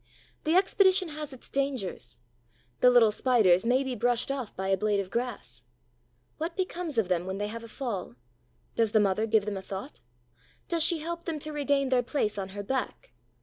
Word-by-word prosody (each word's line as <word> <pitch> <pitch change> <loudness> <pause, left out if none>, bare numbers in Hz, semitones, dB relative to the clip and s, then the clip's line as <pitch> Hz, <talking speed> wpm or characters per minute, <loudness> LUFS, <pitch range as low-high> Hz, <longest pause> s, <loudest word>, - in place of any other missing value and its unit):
The 315 +2 +2
expedition 375 -1 +4
has 300 -1 -6
its 260 - -9
dangers. 255 - -2 0.6
The 250 - +7
little 240 -3 +6
Spiders 215 -5 +3
may 255 +3 +3
be 265 -1 -3
brushed 245 +2 +1
off 260 -6 -4
by 190 +1 -3
a 195 - +4
blade 205 +1 +1
of 195 -1 -4
grass. 230 - -4 0.8
What 330 +3 -3
becomes 355 -6 -3
of 220 -5 +2
them 180 0 0
when 190 +1 -3
they 205 +1 -2
have 230 +1 -6
a - - -9
fall? 220 - -5 0.6
Does 225 -2 +1
the 215 - +6
mother 205 +2 +2
give 220 -2 +3
them 210 -2 -3
a - - -5
thought? 195 +8 -7 0.7
Does 335 -1 0
she 330 0 +2
help 340 +1 -5
them 330 -3 -2
to 305 +1 -5
regain 280 -2 +1
their 255 -1 +3
place 225 -5 -1
on 190 -1 -4
her 205 - -3
back? 265 - -3
245 Hz, 195 wpm, -28 LUFS, 205-295 Hz, 0.8 s, The